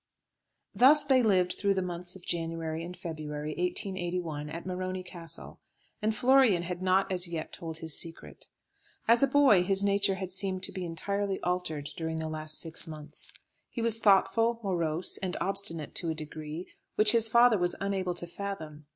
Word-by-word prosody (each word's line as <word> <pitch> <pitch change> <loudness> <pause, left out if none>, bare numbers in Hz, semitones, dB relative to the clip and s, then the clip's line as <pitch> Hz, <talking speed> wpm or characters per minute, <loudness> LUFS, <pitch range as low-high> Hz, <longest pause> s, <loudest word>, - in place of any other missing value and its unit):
Thus 285 +5 +6
they 265 -2 +4
lived 185 -5 +3
through 200 -1 +2
the 190 - 0
months 175 0 -6
of 190 - -13
January 165 -1 -3
and 180 +1 -8
February, 155 -2 -5
1881, 175 -3 -2
at 165 +2 -7
Morony 185 0 -3
Castle, 175 -2 -9 0.4
and 215 +1 0
Florian 250 -7 +4
had 180 0 -5
not 185 +1 +2
as 180 -1 +1
yet 165 -2 -5
told 165 -1 -6
his 160 -2 -5
secret. 165 -1 -6 0.6
As 230 +1 +5
a 275 - +5
boy 270 -8 +5
his 195 +2 +2
nature 200 0 +2
had 190 -1 -5
seemed 190 0 -1
to - - -1
be 185 -2 -5
entirely 200 +4 -2
altered 170 -5 -2
during 160 -1 -3
the 160 0 -3
last 155 0 -2
six 165 -1 -3
months. 155 -2 -8 0.4
He 235 - -4
was 225 -1 +2
thoughtful, 225 +3 +3
morose, 170 -3 0
and 185 -2 -3
obstinate 195 -6 -1
to 170 - 0
a 160 - -1
degree, 155 +2 -6 0.3
which 215 0 +7
his 225 -1 +4
father 235 -2 +5
was 175 0 +1
unable 190 -2 -1
to 175 - +2
fathom. 165 -5 -7
180 Hz, 175 wpm, -29 LUFS, 165-200 Hz, 0.6 s, which